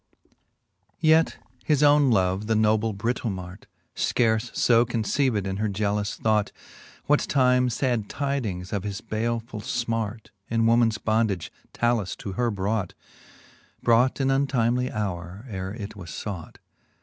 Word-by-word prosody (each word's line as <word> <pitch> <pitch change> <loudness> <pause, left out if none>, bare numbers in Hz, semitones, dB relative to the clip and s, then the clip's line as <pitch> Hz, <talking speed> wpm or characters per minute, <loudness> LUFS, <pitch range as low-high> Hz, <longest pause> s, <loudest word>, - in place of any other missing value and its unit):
Yet 160 0 +4 0.3
his 150 -2 +2
owne 145 -1 +5
love, 95 -1 +1
the 110 - +2
noble 110 +1 +2
Britomart^ 100 -3 -4 0.3
Scarfe 115 +1 +1
{o 115 0 +6
conceived 115 -1 0
in 95 0 -3
her 110 +1 0
jealous 105 +1 -1
thought, 110 -2 +1 0.5
What 150 0 +4
time 125 -2 +3
lad 120 -5 0
tydings 115 -11 -3
of 100 - 0
his 100 0 -4
baleful! 115 0 -3
fmart 115 -1 -3 0.2
In 115 0 +1
womans 115 -1 +3
bondage 110 -5 0 0.3
lalus 120 -5 +1
to 100 - -6
her 120 +4 0
brought 100 -1 -2 0.8
5 - - -36
Brought 120 +3 +3
in 135 0 +2
untimely 125 -3 +1
houre, 95 0 -4
ere 95 -4 -5
it 105 -1 -7
was 90 -5 -9
fought. 95 -4 -6
110 Hz, 135 wpm, -25 LUFS, 100-120 Hz, 0.8 s, o